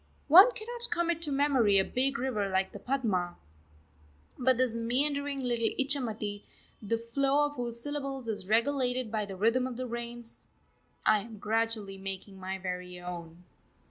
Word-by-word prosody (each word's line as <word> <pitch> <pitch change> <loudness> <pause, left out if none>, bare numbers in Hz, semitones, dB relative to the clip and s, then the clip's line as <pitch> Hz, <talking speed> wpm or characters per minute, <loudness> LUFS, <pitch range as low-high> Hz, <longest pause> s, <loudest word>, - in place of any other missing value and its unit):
One 375 - +10
cannot 475 +2 -5
commit 340 -1 0
to 305 -3 +3
memory 270 -8 +3
a 190 - +4
big 270 +2 0
river 235 -7 -1
like 190 0 0
the 205 - -9
Padma, 205 -9 -1 1.0
but 260 -1 +2
this 250 -2 +1
meandering 280 +4 0
little 240 -2 +1
Ichamati, 225 -7 -1 0.4
the 230 +2 0
flow 275 +5 +1
of 290 - -3
whose 240 -2 -3
syllables 275 -2 -2
is 205 -4 -3
regulated 250 +1 +1
by 215 -2 -1
the 195 -1 -7
rhythm 230 +6 +2
of 250 -2 -6
the 255 - -3
rains, 235 -1 -6 0.6
I 215 - +5
am 220 +1 -9
gradually 215 -2 -1
making 195 0 -7
my 190 +1 -4
very 180 -1 -5
own.... 175 -1 -8
235 Hz, 155 wpm, -30 LUFS, 205-275 Hz, 1.0 s, One